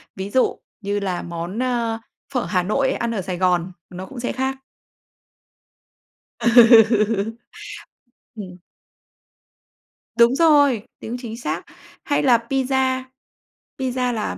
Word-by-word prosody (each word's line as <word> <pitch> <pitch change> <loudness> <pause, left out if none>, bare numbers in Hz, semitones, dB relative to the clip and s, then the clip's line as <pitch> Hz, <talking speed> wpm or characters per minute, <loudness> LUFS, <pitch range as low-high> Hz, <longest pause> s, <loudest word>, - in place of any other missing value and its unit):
ví 190 +1 -5
dụ 255 +5 +1 0.2
như 205 0 -2
là 185 -3 -3
món, 170 +5 -6
ơ, 235 -3 -1 0.3
phở 250 -3 -1
Hà 180 -3 0
Nội 265 +8 0
ăn 235 - -2
ở 195 - -2
Sài 180 0 -5
Gòn 180 0 +1 0.2
nó 185 +1 -8
cũng 245 +6 -10
sẽ 240 - -2
khác. 265 +1 -2 1.8
Ừ. 225 -2 +5 1.0
Ừm. 185 -4 -9 1.6
Đúng 235 +2 +5
rồi, 290 -7 +4 0.2
tiếng 235 +3 -6
chính 230 -2 -7
xác. 240 - -4 0.4
Hay 290 - 0
là 245 -4 +5
pizza, 265 -1 0 0.8
pizza 255 -1 -1
là 215 -2 -3
230 Hz, 120 wpm, -21 LUFS, 200-255 Hz, 1.8 s, Ừ